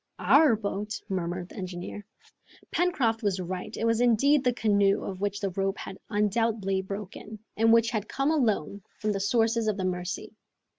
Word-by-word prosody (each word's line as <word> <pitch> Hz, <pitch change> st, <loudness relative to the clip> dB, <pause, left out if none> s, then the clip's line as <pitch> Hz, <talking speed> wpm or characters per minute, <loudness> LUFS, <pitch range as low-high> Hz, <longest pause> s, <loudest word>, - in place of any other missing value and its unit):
"Our 245 Hz, -, +5 dB
boat?" 205 Hz, 0 st, -4 dB
murmured 180 Hz, -1 st, -3 dB
the -, -, -13 dB
engineer. 185 Hz, +2 st, -6 dB, 0.7 s
Pencroft 265 Hz, -11 st, +1 dB
was 200 Hz, -3 st, 0 dB
right. 185 Hz, +4 st, -5 dB
It 225 Hz, -, -1 dB
was 230 Hz, 0 st, +2 dB
indeed 260 Hz, +4 st, +4 dB
the 250 Hz, -, +3 dB
canoe, 205 Hz, -4 st, +2 dB
of 190 Hz, -1 st, -6 dB
which 205 Hz, 0 st, -1 dB
the 195 Hz, -2 st, -2 dB
rope 195 Hz, +2 st, -1 dB
had 190 Hz, -, -8 dB
undoubtedly 210 Hz, -2 st, +1 dB
broken, 200 Hz, +2 st, -7 dB, 0.2 s
and 225 Hz, +1 st, +4 dB
which 230 Hz, 0 st, +4 dB
had 215 Hz, -3 st, -3 dB
come 275 Hz, +3 st, 0 dB
alone 215 Hz, -, 0 dB, 0.2 s
from 215 Hz, -, -1 dB
the 200 Hz, -, -1 dB
sources 225 Hz, +2 st, +1 dB
of 210 Hz, -2 st, 0 dB
the 190 Hz, -, -2 dB
Mercy. 180 Hz, 0 st, -3 dB
210 Hz, 170 wpm, -27 LUFS, 195-230 Hz, 0.7 s, Our